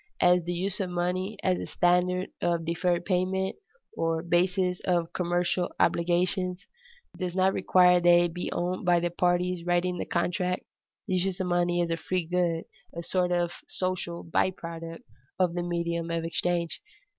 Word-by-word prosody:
As 180 0 +4
the 175 - -2
use 190 +3 -2
of 190 -2 -1
money 180 +3 -2
as 185 -1 +2
a - - -5
standard 180 +1 +1
of 170 -1 0
deferred 175 +1 0
payment, 190 0 0 0.4
or 165 0 0
basis 180 +1 +1
of 170 -2 0
commercial 175 0 0
obligations, 180 +2 +1 0.5
does 180 -1 -3
not 190 0 +3
require 180 -1 +5
that 175 0 +3
it 175 -1 +1
be 180 - -4
owned 180 +1 -2
by 175 -1 +4
the 175 0 -1
parties 175 0 +1
writing 175 0 0
the - - -2
contract, 180 +1 -1 0.4
this 185 -2 +1
use 190 0 -2
of 190 - -1
money 175 0 +1
is 170 -1 -1
a 165 - 0
free 180 +1 -2
good, 170 -1 0 0.3
a 170 - -4
sort 180 0 0
of 175 -1 +1 0.2
social 185 -2 -3
by 165 +2 +1
product 165 -2 -8 0.3
of 180 -2 +2
the 175 - -2
medium 170 -1 -2
of 165 0 -1
exchange. 170 0 -1
175 Hz, 170 wpm, -28 LUFS, 170-180 Hz, 0.5 s, require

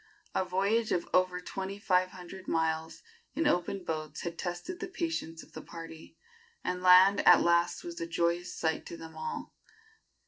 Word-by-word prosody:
A - - +1
voyage 200 +5 +1
of 175 - 0
over 185 0 +3
twenty 190 +2 -5
five 185 -3 +2
hundred 185 +1 -11
miles 160 0 -1 0.3
in 325 - 0
open 185 -5 +1
boats 155 -3 -4
had 170 -1 -4
tested 175 - -5
the 370 - -4
patience 330 - -3
of - - -20
the - - -7
party, 165 -1 -10 0.5
and 180 0 -2
land 185 +2 +7
at 175 - +9
last 170 0 +2
was 170 -1 -7
a 165 - -2
joyous 170 +1 0
sight 160 -1 0
to 170 - -7
them 160 0 -10
all. 470 - -5
180 Hz, 170 wpm, -31 LUFS, 165-190 Hz, 0.5 s, at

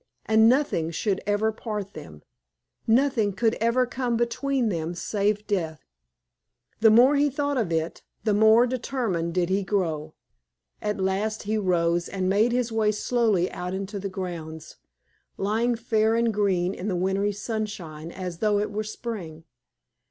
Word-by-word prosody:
And 220 +1 +5
nothing 250 - +1
should 190 +4 -1
ever 205 +2 +2
part 210 -2 -5
them, 75 -2 -11 0.6
nothing 230 -3 +3
could 225 +3 +1
ever 235 +2 +3
come 245 -1 -2
between 240 +1 0
them 170 -2 -3
save 210 +3 -1
death. 165 -6 -2 0.9
The 220 0 +6
more 245 +6 +6
he 290 +1 +3
thought 285 +1 -1
of 200 -8 -1
it 160 0 -2 0.2
the 215 - +2
more 220 +3 +6
determined 230 -9 -2
did 180 -1 +1
he 195 +2 +1
grow. 160 -6 -2 0.7
At 210 -1 -2
last 195 +3 -1
he 215 +1 -1
rose 175 -4 +1
and 190 -2 -2
made 210 +5 +3
his 245 -1 0
way 220 -1 +2
slowly 215 -4 +1
out 180 +1 -4
into 195 +1 -4
the 195 +1 -4
grounds, 170 -4 -7 0.6
lying 225 +5 +1
fair 225 -1 +1
and 230 -1 +2
green 190 -3 +1
in 185 - -6
the 190 - 0
wintry 190 +3 0
sunshine 200 -7 -5
as 180 -2 -6
though 210 -2 +2
it 205 0 -1
were 215 +1 -2
spring. 210 -8 -6
210 Hz, 155 wpm, -25 LUFS, 180-230 Hz, 0.9 s, The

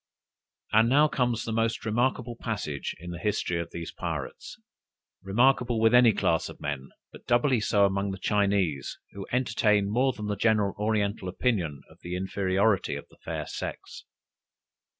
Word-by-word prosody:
And 110 +2 +5
now 145 +4 +5
comes 120 -5 0
the 115 - -3
most 115 0 0
remarkable 120 +1 0
passage 100 - -4
in 90 +1 -7
the 85 - -6
history 90 -3 -1
of 85 0 -4
these 85 -1 -6
pirates - - -6 0.6
remarkable 120 +4 +2
with 115 +1 +4
any 125 -2 +7
class - - 0
of - - -11
men, 70 -2 -4 0.2
but - - -15
doubly 120 +1 +3
so 105 -1 +3
among 100 0 0
the 95 - -4
Chinese, 100 -7 0
who 100 -1 -8
entertain 105 -5 +2
more 130 +4 +2
than 105 -4 -7
the 105 0 -1
general 105 -2 +2
oriental 105 -2 0
opinion 90 - -1
of - - -20
the 90 +1 -5
inferiority 95 +1 +1
of - - -8
the - - -21
fair - - -4
sex. - - -7
105 Hz, 160 wpm, -27 LUFS, 95-115 Hz, 0.6 s, any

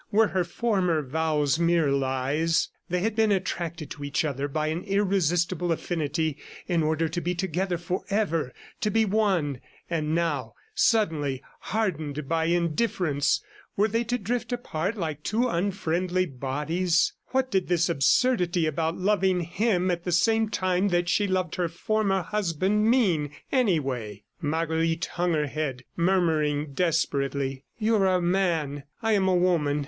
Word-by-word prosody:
Were 220 0 +4
her 185 -1 +1
former 180 -4 0
vows 150 +1 0
mere 170 -3 +3
lies?... 140 +4 +1 0.2
They 180 0 0
had 220 +2 0
been 220 -1 +3
attracted 170 -5 -2
to 145 - -7
each 140 +2 0
other 140 -1 -2
by 155 +2 -1
an 160 +2 -2
irresistible 185 -3 +1
affinity 160 -2 -1 0.3
in 175 -3 +1
order 160 +1 +1
to 170 +3 -3
be 175 +1 -1
together 180 0 -1
forever, 175 -4 -1 0.3
to 215 - 0
be 220 +1 +3
one.... 190 - +1 0.3
And 155 -1 0
now, 165 -6 -1 0.2
suddenly 165 - +1 0.2
hardened 155 -9 -2
by 160 +1 +1
indifference, 170 -3 +1 0.3
were 205 +2 +4
they 230 +2 0
to 245 +2 0
drift 240 +3 -3
apart 220 -4 -2
like 155 -5 -3
two 230 +9 0
unfriendly 185 -2 0
bodies?... 155 +5 0
What 260 0 0
did 190 -2 +1
this 175 -1 +2
absurdity 175 - +2
about 160 +2 -1
loving 190 -2 +2
him 185 +1 +1
at 170 -1 -2
the 180 - -2
same 220 +5 +3
time 185 -1 +1
that 175 -2 +1
she 205 +2 +2
loved 185 -2 -1
her 175 -1 +1
former 195 +1 0
husband 205 +2 +1
mean, 185 - +2 0.2
anyway? 135 - 0 0.2
Marguerite 165 +2 0
hung 175 0 0
her 150 -1 +1
head, 140 -3 -3
murmuring 155 -5 +1
desperately: 140 -4 0
"You 220 0 +2
are 195 -2 +3
a - - +2
man, 170 -6 0 0.2
I 225 - +2
am 195 -3 +3
a 185 - +3
woman. 165 -5 +2
175 Hz, 150 wpm, -26 LUFS, 155-195 Hz, 0.3 s, Were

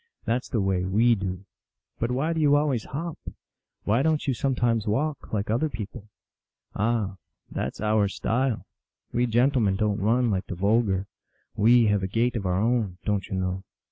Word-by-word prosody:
That 115 - +2
s 125 - -8
the 115 - 0
way 95 -2 +1
we 110 +6 +3
do." 95 -2 -3 0.3
" - - -52
But 115 - 0
why 135 +7 0
do 160 - -1
you 145 -1 +5
always 145 -6 +1
hop? 165 +3 -5 0.6
Why 110 +5 +2
don 160 +1 +3
t - - -10
you - - +3
sometimes 120 -4 0
walk, 140 +8 -1
like 105 0 -1
other 130 +8 +1
people? 110 -2 -7 0.2
" - - -66
" - - -46
Ah, 105 -3 0 0.3
that - - -3
s - - -10
our 105 -1 +2
style. 120 +4 -1 0.5
We 120 +1 +2
gentlemen 120 -3 +2
don 105 0 0
t - - -5
run, 120 +2 +3
like 95 -2 -2
the 90 - -4
vulgar. 100 0 +1 0.5
We 115 +3 +5
have 105 -2 +2
a 95 - -1
gait 115 +5 0
of 100 -5 -2
our 90 +1 +1
own, 110 -4 0
don 105 -1 +1
t - - -12
you 95 - -1
know 95 0 -2
110 Hz, 205 wpm, -26 LUFS, 100-125 Hz, 0.6 s, you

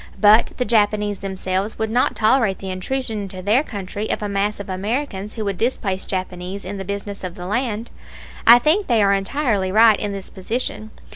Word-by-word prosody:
But 215 +2 +5
the 250 - 0
Japanese 210 -3 +1
themselves 190 +1 -3
would 220 0 -2
not 245 +2 +2
tolerate 220 -3 +3
the 190 -1 -6
intrusion 220 +3 -3
into 185 -2 -7
their 215 +7 +3
country 205 -4 -5
of - - -2
a - - -1
mass 200 +1 -1
of 200 - -7
Americans 205 +2 -3
who 220 -2 -3
would 195 -3 -3
displace 205 -6 -1
Japanese 185 0 -5
in 200 +2 -5
the - - -4
business 200 +1 -5
of 180 -1 -5
the 180 -3 -7
land. 230 +2 -2 0.6
I 235 +1 +11
think 320 +11 +2
they 230 -4 +3
are 200 0 +4
entirely 200 -2 0
right 220 0 +6
in 205 - -2
this 195 -1 -7
position. 215 +2 -4
205 Hz, 195 wpm, -21 LUFS, 195-225 Hz, 0.6 s, I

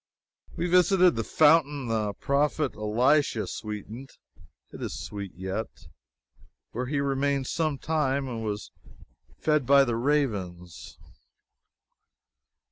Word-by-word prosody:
We 170 - -2
visited 180 0 +4
the 115 - -1
fountain 150 0 +3
the 110 -2 -1
prophet 145 +3 0
Elisha 115 +2 +2
sweetened 105 +7 -7 0.6
(it - - -10
is 65 - -4
sweet 100 +5 -6
yet,) 95 +5 -4 1.0
where 125 +2 -4
he 145 +1 -1
remained 140 0 0
some 155 0 -1
time 140 -2 -1
and 115 -3 -5
was 105 -1 -4 0.7
fed 150 -5 +1
by 140 0 +7
the 120 -3 -1
ravens. 105 - -2
135 Hz, 110 wpm, -27 LUFS, 105-145 Hz, 1.0 s, by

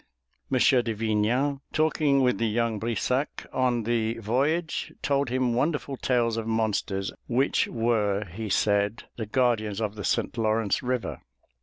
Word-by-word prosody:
M. 130 - +3
de 125 -3 +3
Vignan, 115 +6 0
talking 155 -3 +2
with 125 -6 +2
the 115 - +1
young 115 0 0
Brissac 120 +5 -1
on 125 -3 +1
the 115 0 0
voyage, 140 +9 -1
told 140 -2 +1
him 125 -1 +1
wonderful 140 +2 -1
tales 120 -3 +1
of 115 -1 -3
monsters 105 -3 -1 0.2
which 130 +3 +2
were, 105 -3 0
he 105 +5 -6
said, 100 +2 +1
the 110 -3 -4
guardians 110 -4 +1
of 105 -2 -1
the 105 -1 -7
St. - - 0
Lawrence 110 -2 +1
River. 125 -1 -2
115 Hz, 145 wpm, -26 LUFS, 110-130 Hz, 0.2 s, M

